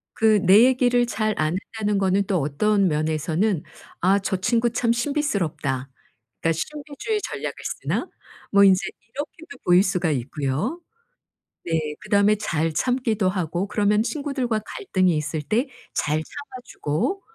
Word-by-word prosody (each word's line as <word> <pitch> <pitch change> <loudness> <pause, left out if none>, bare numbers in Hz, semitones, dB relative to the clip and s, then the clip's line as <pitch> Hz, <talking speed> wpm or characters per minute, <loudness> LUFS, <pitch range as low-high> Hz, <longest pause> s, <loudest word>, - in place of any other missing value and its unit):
그 220 -1 +4
내 200 +5 +7
얘기를 245 -1 +3
잘 215 -1 -1
안 155 +3 +1 0.2
한다는 210 -2 0
거는 195 +1 +2
또 190 - +1
어떤 195 +8 +2
면에서는 160 +4 0 0.4
'아 190 +3 +4
저 190 -1 -1
친구 235 +5 +1
참 230 0 +1
신비스럽다.' 200 - -1 0.5
그러니까 165 - +2
'신비주의 300 - -4
전략을 - - -4 0.3
쓰나?' - - -2 0.4
뭐 200 0 +6
인제 190 -2 +6 0.4
이렇게도 295 0 -7
보일 180 +1 +6
수가 180 -4 0
있고요. 145 - -2 0.8
네 160 -3 -1
그다음에 205 +1 +3
잘 165 -6 -1
참기도 225 -2 +1
하고 180 0 -2
그러면 210 0 +2
친구들과 265 -5 -1
갈등이 185 - 0
있을 150 +1 -2
때 225 - 0 0.3
잘 150 +1 0
참아 265 - -10
주고. 235 - -2
200 Hz, 295 characters per minute, -23 LUFS, 165-240 Hz, 0.8 s, 내